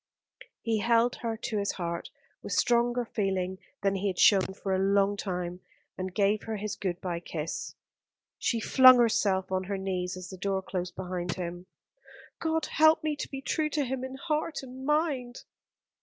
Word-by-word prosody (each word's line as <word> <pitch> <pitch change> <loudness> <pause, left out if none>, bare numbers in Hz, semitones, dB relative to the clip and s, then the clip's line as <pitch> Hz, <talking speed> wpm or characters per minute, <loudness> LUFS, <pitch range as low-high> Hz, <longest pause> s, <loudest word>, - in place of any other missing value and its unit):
He 225 -2 +1
held 235 +2 +3
her 230 -2 -3
to 215 -1 -2
his 200 - -1
heart, 170 -2 -4 0.3
with - - -5
stronger 240 0 +2
feeling 190 -4 -2 0.2
than 195 -1 +3
he 195 +1 -1
had 185 -2 -2
shown 190 -2 +5
for 195 -1 -2
a 190 - +1
long 200 +1 +3
time, 180 -3 -4 0.4
and 185 0 -4
gave 205 +2 +2
her 220 -1 -3
his 210 +1 -4
good 180 -3 -3
bye 175 -2 -2
kiss. 165 -2 -5 0.6
She 230 - 0
flung 255 +3 +8
herself 200 -5 +2
on 185 0 0
her 200 +1 -2
knees 185 -1 -3
as 185 +1 -8
the 190 - -8
door 190 0 -1
closed 180 -1 -4
behind 180 -2 -3
him. 175 0 -6 0.7
"God 320 -1 0
help 315 0 +4
me 305 -1 0
to - - -5
be 270 -1 -6
true 310 +2 0
to 295 -2 0
him 260 0 -3
in 260 0 -5
heart 310 +1 -2
and 260 +1 -8
mind." 290 -6 0
200 Hz, 180 wpm, -29 LUFS, 185-245 Hz, 0.7 s, flung